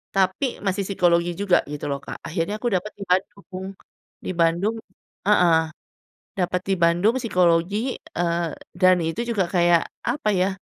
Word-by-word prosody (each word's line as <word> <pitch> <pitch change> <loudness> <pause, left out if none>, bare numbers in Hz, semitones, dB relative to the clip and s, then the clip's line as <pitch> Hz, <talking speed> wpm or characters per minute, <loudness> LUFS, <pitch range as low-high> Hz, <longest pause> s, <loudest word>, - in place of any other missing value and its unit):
tapi 195 +7 0
masih 195 +1 0
psikologi 175 -3 +2
juga 195 -1 +3
gitu 145 0 -5
loh 140 - -2
Kak, - - -8
akhirnya 170 +4 -2
aku 240 - -2
dapet 185 +4 -2
di - - -4
Bandung, 190 0 -2 0.6
di - - -2
Bandung 170 +6 +2 0.5
heeh, 180 -5 +5 0.8
dapat 180 0 0
di 195 - +3
Bandung 175 +7 +3
psikologi, 185 +3 +1 0.3
eee, 170 -1 0 0.3
dan 185 0 +5
itu 165 +7 -2
juga 205 -5 +1
kayak 175 -1 +4 0.2
apa 245 0 -1
ya, 185 0 +2
185 Hz, 145 wpm, -23 LUFS, 170-200 Hz, 0.8 s, heeh